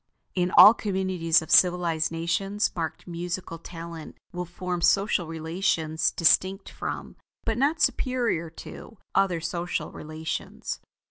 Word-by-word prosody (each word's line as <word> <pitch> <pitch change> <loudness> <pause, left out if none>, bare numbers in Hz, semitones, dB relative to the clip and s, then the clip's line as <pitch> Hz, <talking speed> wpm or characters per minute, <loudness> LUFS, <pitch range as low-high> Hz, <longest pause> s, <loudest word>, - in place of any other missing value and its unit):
In 180 -1 +1
all 215 - +11
communities 185 -6 +1
of - - -9
civilized 175 -3 +4
nations 195 +5 -1
marked 165 -2 -4
musical 175 0 -5
talent 165 -1 -9 0.2
will 180 0 -3
form 175 0 -4
social 195 -1 +2
relations 160 -1 0
distinct 190 +3 +2
from, - - -6 0.3
but 225 - 0
not 290 +6 +1
superior 245 - 0
to, 220 +6 -11 0.2
other 185 -4 +2
social 170 -1 -3
relations. 155 +1 -5
175 Hz, 120 wpm, -26 LUFS, 165-195 Hz, 0.3 s, all